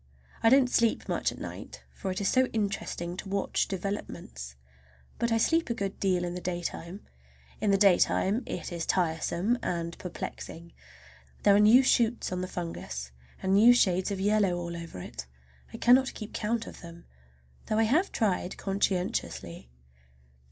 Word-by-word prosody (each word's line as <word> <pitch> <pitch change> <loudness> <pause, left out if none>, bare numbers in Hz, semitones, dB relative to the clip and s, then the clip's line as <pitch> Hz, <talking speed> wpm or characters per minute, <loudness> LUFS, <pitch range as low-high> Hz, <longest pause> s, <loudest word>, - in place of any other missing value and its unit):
I 225 - +5
don't 265 +1 +6
sleep 235 -2 +1
much - - 0
at - - -10
night, - - -8
for 195 - -5
it 185 - -2
is 200 - 0
so 260 0 +3
interesting 200 -5 -2
to 195 - -7
watch 200 0 0
developments; 175 - -5 0.6
but 235 0 0
I 225 - +3
sleep 325 +6 +2
a 235 - -1
good 200 -3 -4
deal 185 -2 +1
in 175 0 -3
the 180 - -5
daytime. 175 +1 -4 0.6
In 215 - +1
the 195 - +4
daytime 195 +2 +3
it 175 - -5
is 170 -1 -4
tiresome 175 +6 0
and 170 -1 -3
perplexing. 170 -1 -7 0.7
There 200 - +6
are - - +6
always 210 +1 +6
new 255 +3 +8
shoots 240 -4 +2
on 180 0 -2
the 185 - -3
fungus, 65 - -6 0.3
and 190 0 +1
new 230 +5 +7
shades 185 -5 +2
of 200 -2 -3
yellow 200 -2 +2
all 170 -1 -5
over 170 - -8
it. 60 -7 -8 0.4
I - - -7
cannot 260 +2 +4
keep 215 -1 -8
count 225 +2 -1
of - - -11
them, 170 -1 -11 0.6
though 215 - 0
I 225 - +4
have 310 - +2
tried 190 -3 -1
conscientiously. 190 - -2
195 Hz, 170 wpm, -29 LUFS, 175-220 Hz, 0.7 s, new